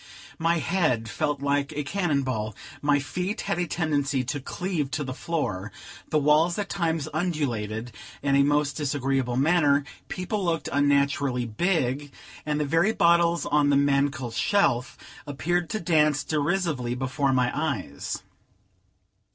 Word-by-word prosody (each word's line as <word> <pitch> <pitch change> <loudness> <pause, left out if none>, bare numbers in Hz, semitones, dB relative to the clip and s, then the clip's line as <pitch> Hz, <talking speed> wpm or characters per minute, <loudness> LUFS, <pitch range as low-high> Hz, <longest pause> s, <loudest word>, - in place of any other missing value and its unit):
My 165 +1 +2
head 155 -9 0
felt 145 +6 -2
like 140 0 +1
a 150 - -2
cannon 155 -3 0
ball; 110 -5 -3 0.3
my 145 0 +3
feet 180 +9 -3
had 195 -3 -2
a 175 - 0
tendency 145 -6 0
to 145 +4 -3
cleave 165 0 -3
to 150 +1 -2
the 130 -2 -4
floor; 115 - -3 0.4
the 155 - +2
walls 150 +4 +3
at 205 - -3
times 165 -5 -1
undulated 120 - -2 0.3
in 140 -1 +2
a 140 - +5
most 145 0 +2
disagreeable 135 -4 -1
manner; 145 0 +3 0.2
people 190 +3 -3
looked 165 -2 -1
unnaturally 140 -3 +2
big; 140 - 0 0.4
and 150 0 0
the 150 - +1
"very 165 +9 +2
bottles 170 -1 +3
on 145 -1 +3
the 140 - +4
mankle 140 -3 +1
shelf" 165 - +1 0.3
appeared 170 +4 -1
to 215 - -2
dance 150 -4 +2
derisively 150 -5 -1
before 135 +2 0
my 125 -1 +2
eyes. 140 - -3
145 Hz, 145 wpm, -26 LUFS, 135-165 Hz, 0.4 s, a